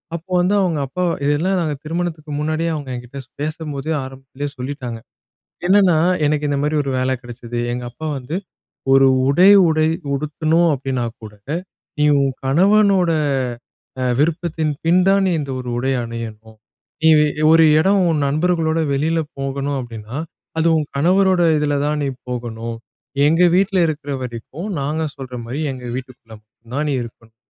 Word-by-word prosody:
அப்போ 170 +3 -9
வந்து 185 +3 +2
அவுங்க 175 -6 +1
அப்பா 180 +7 -3 0.2
இதெல்லாம் 165 +7 +1 0.3
திருமணத்துக்கு 160 -2 -3
முன்னாடியே 155 +2 -1
அவுங்க 145 -3 -6
என்கிட்ட 125 +3 -8
ஸ் - - -40
பேசும்போதே 155 -1 -3
ஆரம்பத்திலேயே 135 +2 -7
சொல்லிட்டாங்க. 125 -3 -5 0.7
என்னன்னா, 190 -3 +5 0.3
"எனக்கு 150 0 +1
இந்தமாரி 145 +2 0
ஒரு 135 - -3
வேல 130 +1 0
கிடைச்சது. 120 -1 -6
எங்க 125 0 -4
அப்பா 155 +6 -6
வந்து 130 +5 -5 0.6
ஒரு 135 0 +6 0.2
உடை 175 +8 +6 0.2
உடை 155 0 +2 0.3
உடுத்தணும் 155 +4 +1
அப்டினாகூட 120 -5 -4 0.7
நீ 150 - +4
உன் 135 -1 +2
கணவனோட 190 +4 +4 0.9
அ - - 0 0.2
விருப்பத்தின் 160 0 0
பின்தான் 185 +3 +4
நீ - - +1
இந்த 140 -2 -4
ஒரு 125 -1 -5
உடை 130 +2 0
அணியணும். 110 -1 -8 0.4
நீ 160 - +5
வே 150 - +4 0.3
ஒரு 165 0 +7 0.2
இடம் 195 +4 +3
உன் 155 -3 +1
நண்பர்களோட 160 +2 +1
வெளில 160 +4 +1 0.2
போகணும் 135 +1 -2
அப்டின்னா, 115 0 -7 0.4
அது 160 +1 +2
உன் 155 - -1
கணவரோட 185 +4 +3 0.2
இதுல 150 -1 0
தான் 150 0 0
நீ - - 0 0.2
போகணும். 115 -2 -5 0.5
எங்க 165 +4 +3
வீட்ல 195 +1 +2
இருக்கற 145 -2 -4
வரைக்கும் 125 - -6
நாங்க 150 +3 -1
சொல்றமாரி 125 -1 -6
எங்க 130 -1 -8
வீட்டுக்குள்ள 125 -3 -9
மட்டும் 115 +2 -18
தான் 150 +2 0
நீ - - 0
இருக்கணும். 115 -1 -13
145 Hz, 145 wpm, -19 LUFS, 130-165 Hz, 0.9 s, ஒரு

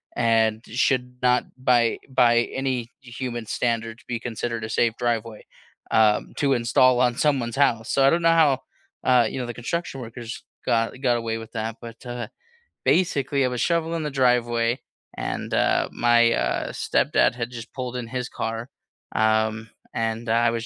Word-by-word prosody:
and 115 -1 +2
should 125 +1 0
not 125 0 +3
by 120 -2 +2
by 120 -2 +4
any 130 -3 -2
human 120 -1 -5
standards 115 +1 -2
be 120 -2 -3
considered 115 -1 -4
a 110 - -4
safe 115 0 +2
driveway, 115 -2 -2 0.5
um, 110 -1 +3
to 140 -1 +2
install 125 +1 +3
on 125 -1 +3
someone's 135 -6 +1
house, 115 -6 +2
so, 135 - +3
I - - +7
don't 170 - +2
know 165 - +5
how, 155 -5 +4 0.4
uh, 125 -2 +4
you - - -5
know, 125 - -2
the 120 - -5
construction 135 +1 -4
workers 115 0 -7 0.2
got 115 0 +1
got 120 -3 +2
away 115 -1 -2
with 110 0 -10
that, 110 0 -3
but, 115 -1 -10
uh, 120 0 -4 0.6
basically 140 -6 +2
I - - +1
was 125 -1 -4
shoveling 165 -1 0
the 150 - -3
driveway 120 -2 +2 0.4
and, - - -4
uh, - - +2
my, 120 0 +4
uh, - - -1
stepdad - - +2
had 120 -1 -3
just 115 -1 -9
pulled 125 -2 -5
in 120 - -5
his 125 +1 -3
car, 115 +2 -4 0.5
um, 110 +1 +1 0.2
and 115 +1 -2
I 115 +1 +3
was 115 0 -3
120 Hz, 170 wpm, -24 LUFS, 115-130 Hz, 0.6 s, I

